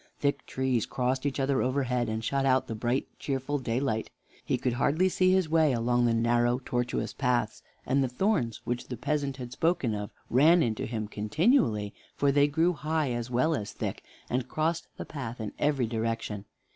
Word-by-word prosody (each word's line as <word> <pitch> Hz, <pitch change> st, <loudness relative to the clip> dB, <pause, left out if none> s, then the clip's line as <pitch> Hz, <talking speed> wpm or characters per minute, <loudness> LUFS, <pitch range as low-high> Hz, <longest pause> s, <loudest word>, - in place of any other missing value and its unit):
Thick 140 Hz, -1 st, -1 dB
trees 130 Hz, -4 st, 0 dB
crossed 130 Hz, +2 st, -1 dB
each 140 Hz, -, -3 dB
other 135 Hz, 0 st, +1 dB
overhead, 125 Hz, -2 st, 0 dB
and 110 Hz, +1 st, -3 dB
shut 135 Hz, +4 st, 0 dB
out 130 Hz, -1 st, +3 dB
the -, -, -5 dB
bright, 120 Hz, +4 st, 0 dB
cheerful 140 Hz, +1 st, -2 dB
daylight. 120 Hz, -2 st, -1 dB, 0.3 s
He -, -, 0 dB
could 125 Hz, -, -1 dB
hardly 155 Hz, +9 st, +2 dB
see 185 Hz, 0 st, +3 dB
his 185 Hz, -2 st, +3 dB
way 155 Hz, -3 st, +3 dB
along 120 Hz, +1 st, +2 dB
the 115 Hz, -, +2 dB
narrow, 120 Hz, +1 st, +2 dB
tortuous 120 Hz, 0 st, -1 dB
paths, 125 Hz, -5 st, 0 dB, 0.2 s
and 135 Hz, +1 st, +2 dB
the -, -, +1 dB
thorns 125 Hz, -, 0 dB
which 120 Hz, 0 st, -3 dB
the 125 Hz, -, -5 dB
peasant 140 Hz, +1 st, -1 dB
had 125 Hz, -2 st, -7 dB
spoken 165 Hz, -6 st, +1 dB
of 105 Hz, -1 st, -4 dB, 0.2 s
ran 160 Hz, +7 st, +5 dB
into 110 Hz, -4 st, -1 dB
him 110 Hz, -2 st, -3 dB
continually, 105 Hz, -, +1 dB, 0.2 s
for 140 Hz, -1 st, +2 dB
they 145 Hz, +1 st, +4 dB
grew 165 Hz, +5 st, +2 dB
high 155 Hz, -1 st, -1 dB
as 120 Hz, 0 st, -3 dB
well 125 Hz, +7 st, +2 dB
as 105 Hz, -9 st, -3 dB
thick, -, -, -4 dB, 0.2 s
and 125 Hz, 0 st, -2 dB
crossed 165 Hz, +2 st, -1 dB
the -, -, -5 dB
path 125 Hz, -5 st, -6 dB
in 110 Hz, -2 st, -4 dB
every 145 Hz, -4 st, +2 dB
direction. 115 Hz, -2 st, -3 dB
130 Hz, 185 wpm, -29 LUFS, 120-145 Hz, 0.3 s, ran